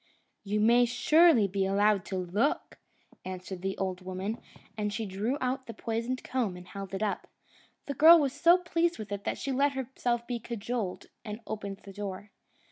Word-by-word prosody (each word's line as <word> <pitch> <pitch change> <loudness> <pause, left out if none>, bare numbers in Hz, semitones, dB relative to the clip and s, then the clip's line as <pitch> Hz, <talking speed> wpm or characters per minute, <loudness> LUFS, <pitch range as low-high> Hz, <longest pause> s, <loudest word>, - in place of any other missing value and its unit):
"You 210 +1 -1
may 235 +3 +5
surely 250 0 +5
be 195 0 -1
allowed 200 0 +2
to 190 - -4
look!" 190 +10 -1 0.4
answered 185 0 -6
the 195 +1 -3
old 185 -1 -2
woman, 185 +4 -4 0.3
and 210 -1 -2
she 220 +2 -3
drew 210 +8 -2
out 260 +1 -2
the 230 - -7
poisoned 230 +3 -3
comb 230 -9 -1
and 180 0 -12
held 195 0 -7
it 195 - -2
up. 210 - -2 0.6
The 280 - -3
girl 325 +4 +9
was 280 -4 +1
so 335 +5 +5
pleased 340 -1 0
with 215 -2 -8
it 200 0 -4
that - - -1
she 275 - -3
let 280 +2 +2
herself 245 -2 -2
be 240 -1 -3
cajoled, 230 -3 -4 0.2
and 210 -1 -6
opened 200 -2 -5
the 195 - -11
door. 200 0 -6
215 Hz, 185 wpm, -29 LUFS, 195-255 Hz, 0.6 s, girl